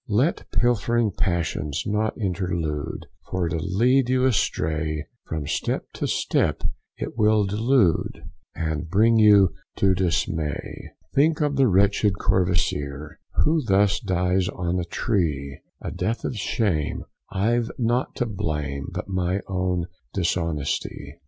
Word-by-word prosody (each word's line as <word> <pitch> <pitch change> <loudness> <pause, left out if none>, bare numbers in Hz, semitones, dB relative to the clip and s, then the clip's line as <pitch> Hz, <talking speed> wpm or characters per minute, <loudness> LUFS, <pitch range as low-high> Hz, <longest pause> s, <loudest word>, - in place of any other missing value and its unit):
Let 125 +11 +1
pilfering 120 -2 +2
passions 85 -7 -1
not 105 +1 0
intrude, 85 -7 -2 0.2
For 90 -2 0
to 80 - -1
lead 120 +9 +2
you 130 0 +3
astray, 80 - 0 0.2
From 80 -2 -3
step 75 - -1
to - - -2
step - - 0 0.3
it - - -5
will 105 -1 +4
delude, 105 -1 +1 0.3
And 80 -2 -3
bring 110 +5 +4
you 105 -3 +7 0.3
to 95 -1 +3
dismay. 80 -4 -2 0.2
Think 155 +3 +3
of 145 -2 +1
the 135 -1 +4
wretched 100 0 +3
Courvoisier, 75 -5 0 0.3
Who 155 0 +2
thus 100 -2 +3
dies 90 0 +1
on 90 0 -2
a 85 - -2
tree, 80 - -1 0.2
A - - -3
death 115 +2 -2
of - - -2
shame, 100 -8 -1 0.3
I've 115 +4 +1
nought 120 +1 0
to 120 - 0
blame, 75 - -3
But - - -5
my 95 0 0
own 90 -2 -1 0.3
dishonesty. 85 -5 -2
95 Hz, 125 wpm, -24 LUFS, 80-110 Hz, 0.3 s, you